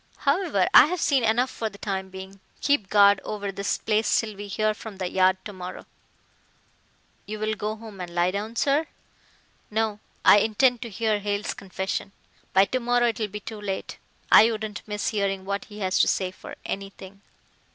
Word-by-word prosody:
However, 285 - +1
I - - +9
have 360 +2 -2
seen 275 -5 +2
enough 240 +3 +2
for 225 - -3
the 200 - -14
time 190 -2 -4
being. 190 +1 -10 0.2
Keep 280 -10 +1
guard 200 -1 +5
over 205 -2 -4
this 200 +1 -2
place 215 0 +1
till 215 -2 -4
we 205 +1 -7
hear 215 +2 0
from 210 -1 -10
the 185 -1 -2
Yard 185 +1 +3
tomorrow." 185 -4 -8 1.4
"You'll 215 +1 -2
go 215 +1 -3
home 220 -4 -10
and 175 - -5
lie 175 +1 +2
down, 210 +4 -4
sir." 285 +6 +1 0.8
"No. 215 -1 -1 0.3
I 205 - +8
intend 235 +3 +2
to 235 - -5
hear 215 0 0
Hale's 205 0 -2
confession. 195 +1 -4 0.4
By 195 +1 +5
to 255 +6 -2
morrow 245 0 +2
it 225 - -4
will 215 - 0
be 210 +1 -7
too 215 0 -8
late. 195 -2 -5 0.3
I 225 - +8
wouldn't 215 -2 -5
miss 210 -1 -2
hearing 195 -3 -1
what 200 +1 -3
he 210 - -12
has 185 0 +1
to - - +5
say 185 -1 0
for 185 - -11
anything." 195 0 -7
210 Hz, 185 wpm, -25 LUFS, 195-225 Hz, 1.4 s, I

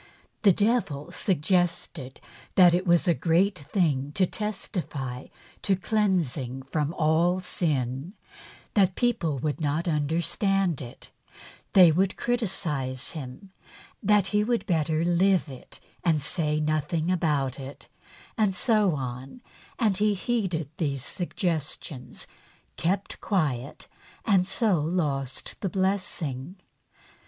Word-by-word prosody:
The 200 - +6
devil 180 - 0
suggested 175 -6 -1 0.4
that 180 -2 +7
it 180 +2 0
was 175 +2 +4
a 170 - +5
great 180 +4 +2
thing 145 -3 0
to 190 - +3
testify 170 -11 -4 0.3
to 195 - +2
cleansing 170 - 0
from 150 +2 -1
all 170 +3 +2
sin; 145 -3 -1 0.6
that 190 -3 +3
people 225 - 0
would 150 +4 -2
not 155 +3 -1
understand 170 +3 0
it; 120 -2 -10
that - - -22
they 180 -4 +8
would 190 +4 +1
criticise 160 - -1
him; 155 +6 -8 0.5
that 210 -1 +4
he 210 0 +3
would 235 +1 0
better 160 -3 +1
live 180 0 +3
it 130 -2 -10 0.2
and 160 -3 +3
say 150 0 0
nothing 155 +2 0
about 145 -7 0
it; 135 +1 -9 0.5
and 205 -3 +2
so 210 - +3
on, 130 - -6 0.4
and 215 -6 +2
he 210 0 +2
heeded 185 - -2
these 140 -5 -1
suggestions, 160 -6 -3 0.5
kept 195 +4 -2
quiet, 145 - -1 0.4
and 190 -4 +3
so 190 -2 +2
lost 145 -5 -2
the 195 - -1
blessing. 185 -6 -1
170 Hz, 115 wpm, -26 LUFS, 145-195 Hz, 0.6 s, they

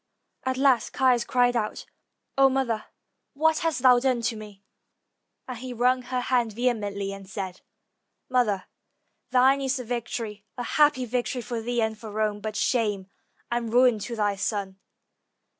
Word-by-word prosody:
At 260 0 0
last 265 -3 +3
Caius 255 -3 +3
cried 245 -1 +2
out, 215 -2 -2 0.5
"0 270 0 +7
mother, 255 -5 -1 0.5
what 315 +2 +3
hast 325 -6 -1
thou 250 -2 +7
done 255 -2 +1
to 225 0 0
me?" 210 -2 -11 0.8
and 250 -3 -6
he 255 0 -6
wrung 250 +2 +2
her 250 0 -3
hand 245 -3 +1
vehemently, 205 -4 -1
and 195 -1 -10
said, 190 -2 -5 0.7
"Mother, 230 -7 +1 0.6
thine 260 +2 +4
is 270 0 0
the 250 - -5
victory; 225 -3 -4
a 245 - -3
happy 290 0 +3
victory 245 +1 -2
for 230 +1 -4
thee 240 0 0
and 220 -1 -2
for 220 - -8
Rome, 210 0 -1
but 215 0 -5
shame 210 -7 0 0.4
and 235 -1 -1
ruin 245 -2 +4
to 235 +3 -5
thy 205 -2 0
son." 195 -1 -3
240 Hz, 160 wpm, -26 LUFS, 215-255 Hz, 0.8 s, 0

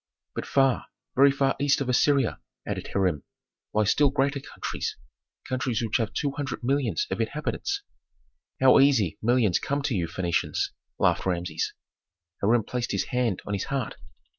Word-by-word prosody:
"But - - -5
far, 135 -2 +2 0.3
very 140 +2 +7
far 135 -1 +1
east 140 -1 +3
of 140 - -2
Assyria," 130 0 +2 0.3
added - - -3
Hiram, 90 -7 0 0.5
"lie 110 - +2
still 140 +7 +4
greater 140 +1 +1
countries - - -5 0.5
countries 130 -2 -1
which 110 - +1
have 115 -3 -1
two 145 - -1
hundred 140 -3 -4
millions 140 - +1
of - - -1
inhabitants." 405 0 -2 0.8
"How 130 -1 +7
easy 130 - +3
millions 115 -5 +3
come 140 0 -2
to 140 - 0
you 85 -3 0
Phœnicians," 85 -1 -1 0.3
laughed - - +2
Rameses. 90 -1 -2 0.7
Hiram 110 +3 +3
placed 125 +3 -3
his - - -1
hand 120 -6 0
on 105 - -3
his 100 - -1
heart. 135 -4 -3
125 Hz, 155 wpm, -26 LUFS, 105-140 Hz, 0.8 s, very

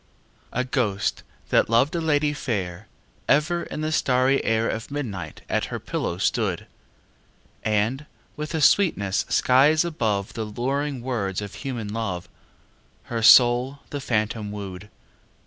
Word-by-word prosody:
A 125 - 0
ghost, 120 -6 -1 0.3
that - - +3
loved 120 +6 +3
a 170 - -1
lady 150 -2 +1
fair, 100 -9 -4 0.4
Ever 170 +4 +3
in 150 - -6
the 155 0 -1
starry 130 -2 +2
air 115 0 +1
Of 110 0 -4
midnight 105 - -5
at - - 0
her - - -5
pillow - - -3
stood; - - 0 1.0
And, 110 +7 0 0.3
with 150 +2 -5
a 160 - 0
sweetness 105 - +3
skies 145 +6 +4
above 110 - -1
The 110 - -3
luring 135 +4 -2
words 105 -7 -2
of 105 -2 -6
human 120 -7 -5
love, 100 -6 -3 0.8
Her 115 -1 -4
soul 125 +4 +6
the 145 - -4
phantom 110 -3 -1
wooed. 100 -1 -7
120 Hz, 135 wpm, -24 LUFS, 105-145 Hz, 1.0 s, soul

